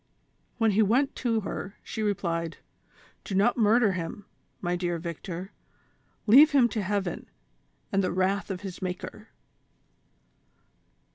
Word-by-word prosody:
When 225 -2 +3
he 210 +2 +3
went 245 +7 +2
to 230 -3 0
her, 195 0 -5
she 220 - -5
replied: 170 -5 -1 0.7
"Do 195 - -4
not 205 +5 +3
murder 225 -1 +4
him, 185 +2 -5 0.3
my 175 -1 -1
dear 175 -1 -1
Victor, 170 +3 -6 0.7
leave 285 +8 +8
him 260 -4 +6
to 220 - -2
heaven, 195 -2 -2 0.6
and 195 0 +2
the 185 - 0
wrath 190 +3 0
of 185 -2 -4
his 190 -3 -7
Maker." 190 +4 -6
195 Hz, 130 wpm, -27 LUFS, 180-220 Hz, 0.7 s, leave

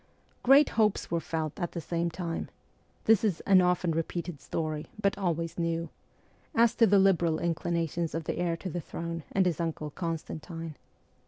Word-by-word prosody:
Great 275 +3 +6
hopes 215 -3 +1
were 170 - +2
felt 160 -1 -3
at 175 -2 -2
the 170 - -3
same 170 +2 -1
time 170 0 -4 0.6
this 225 -2 +5
is 200 -7 +1
' - - -8
an 190 -2 +5
often 180 -1 +2
repeated 165 -1 -3
story, 155 -2 -3
but 200 -1 +2
always 170 -3 -2
new 165 0 -1 0.3
' - - -31
as 230 - +1
to 230 -2 +5
the 200 - +5
liberal 175 -4 +4
inclinations 170 -1 -1
of 165 - -2
the - - -3
heir 170 -1 0
to 185 - -5
the 175 - -3
throne 165 +1 -5
and 190 -1 +3
his 175 -3 0
uncle 155 -2 -3
Constantine. 165 0 -5
170 Hz, 180 wpm, -29 LUFS, 165-185 Hz, 0.6 s, Great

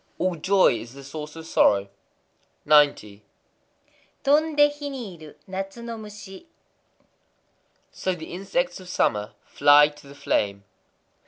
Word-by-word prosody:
_ - - -40
All 185 0 0
joy 185 -5 +3
is 120 +3 -11
the 140 - -11
source 150 +2 -8
of 160 0 -9
sorrow. 100 -10 +3 0.8
90.—Tondé 155 - 0
hi 290 -1 -4
ni 240 -9 -7
iru 155 -2 -13
natsu 195 +4 -6
no 235 0 -6
mushi. 210 - -11 1.4
So 185 -1 -2
the 160 -1 -9
insects 260 +9 -2
of 185 -1 -12
summer 105 -10 -1
fly 145 +1 +5
to 145 -1 -17
the 140 - -13
flame. 100 -7 -1
175 Hz, 130 wpm, -24 LUFS, 145-210 Hz, 1.4 s, fly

